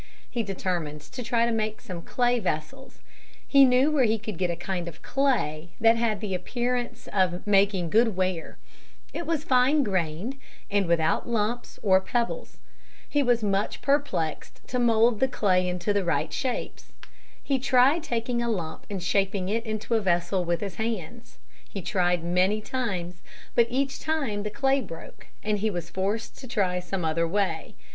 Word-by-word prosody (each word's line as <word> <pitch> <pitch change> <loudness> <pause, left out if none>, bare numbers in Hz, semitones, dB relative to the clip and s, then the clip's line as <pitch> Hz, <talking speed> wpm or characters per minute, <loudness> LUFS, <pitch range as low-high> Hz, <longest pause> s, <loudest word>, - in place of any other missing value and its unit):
He 240 - -1
determined 180 -7 -3
to 245 - -8
try 235 0 +2
to 235 - 0
make 215 -1 -1
some 180 -7 -7
clay 245 +5 +1
vessels. 200 - -4 0.4
He 275 -1 +7
knew 255 +4 +4
where 290 -4 +3
he 220 0 +2
could 215 -4 -6
get 180 -2 +1
a 170 - -1
kind 175 0 -4
of 165 -2 -9
clay 210 - 0
that 225 +1 +6
had 230 -3 0
the 205 -3 -3
appearance 240 +6 -2
of 185 -2 +1
making 195 -4 +3
good 225 -2 +4
ware. 185 -3 -2 0.6
It 340 - -4
was 320 -3 0
fine 270 +2 +4
grained 190 - -2 0.3
and 200 -2 +2
without 165 +4 +1
lumps 230 +1 -1
or 190 -2 +5
pebbles. 240 - -2 0.5
He 290 - +1
was 245 -4 +2
much 200 0 -1
perplexed 280 - -1
to 250 - -1
mould 230 -1 +4
the 265 - +4
clay 185 -7 +2
into 180 +3 -1
right 170 - 0
shapes. 255 -3 -4 0.5
He 275 -2 +1
tried 265 +5 +4
taking 240 -4 -1
a 235 - -1
lump 175 -8 -4
and 195 -4 -4
shaping 195 0 0
it 225 +2 0
into 215 +1 -3
a 225 - +3
vessel 180 0 +1
with 170 -1 -1
his 195 -4 -5
hands. 225 0 -4 0.3
He 195 - -6
tried 175 -2 +1
many 180 +5 +2
times, 190 -8 -3 0.3
but 235 -1 +4
each 270 +2 -1
time 275 -10 -1
the 210 - -3
clay 270 +4 +1
broke 165 -7 -10 0.2
and 210 -1 0
he 215 +2 +1
was 175 -4 -5
forced 200 +4 -2
to 260 - -9
try 190 -6 0
some 180 0 -3
other 165 +1 +1
way. 200 +3 -1
210 Hz, 170 wpm, -26 LUFS, 180-245 Hz, 0.6 s, He